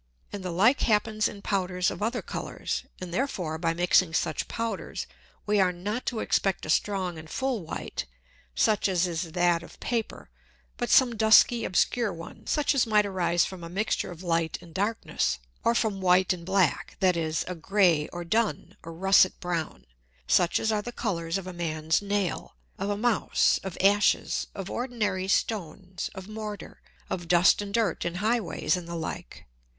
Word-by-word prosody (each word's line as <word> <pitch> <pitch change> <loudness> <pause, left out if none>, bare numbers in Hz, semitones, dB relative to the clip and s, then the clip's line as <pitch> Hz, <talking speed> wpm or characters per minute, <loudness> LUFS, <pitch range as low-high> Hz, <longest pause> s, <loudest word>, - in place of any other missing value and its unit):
And 200 -2 -5
the 180 - -3
like 210 +11 +3
happens 215 0 +2
in 200 -1 -9
Powders 180 -2 0
of - - -7
other 235 +3 -1
Colours. - - -4
And 180 -2 -7
therefore 180 - -2
by 165 0 0
mixing 175 -1 +3
such 155 -3 -1
Powders, 230 0 -4 0.4
we 210 0 +2
are 185 -2 +4
not 205 +7 -4
to 230 -3 -1
expect 195 -2 0
a 155 - -1
strong 185 -3 0
and 155 0 -11
full 260 -1 -1
White, 160 - -5 0.5
such 210 - +2
as 185 -1 +2
is 170 -1 -3
that 175 -1 +2
of 170 - -14
Paper, 230 -3 -3 0.5
but 240 - -2
some 245 -3 +5
dusky 220 +2 +5
obscure 220 +4 +1
one, 165 0 -10
such 295 -1 +2
as 260 -4 +2
might 210 -1 +4
arise 175 -3 +1
from 185 -2 -8
a 170 - -7
Mixture 200 +5 -1
of 175 0 -9
Light 165 -2 0
and 170 -2 -15
Darkness, 205 +5 -1 0.3
or 230 - +3
from 210 -5 0
white 185 0 +4
and 170 -1 -9
black, 190 -4 +1
that 185 -2 +3
is, 160 -2 -1
a 180 - -3
grey, 175 -3 +2
or 175 0 -5
dun, 215 +6 -1
or 165 - -9
russet 190 +2 +4
brown, 170 - -3 0.4
such 175 - +3
as 220 - 0
are 210 -1 0
the 240 - -6
Colours 170 -8 -2
of 195 - -6
a 185 - -6
Man's 160 -1 0
Nail, 200 -2 -2 0.2
of 195 +1 -2
a 205 - -1
Mouse, 230 -1 +2
of 190 -2 -6
Ashes, 205 +2 +2
of 195 -2 -5
ordinary 210 -7 -2
Stones, 190 -2 -2
of 190 0 -8
Mortar, 215 -1 -7 0.3
of 175 -2 -4
Dust 175 +3 +5
and 200 -1 -6
Dirt 215 -5 0
in 175 0 -3
High 220 +6 +1
ways, 175 -3 -1
and 180 -2 -6
the 170 - -5
like. 160 - -6
190 Hz, 180 wpm, -27 LUFS, 170-215 Hz, 0.5 s, some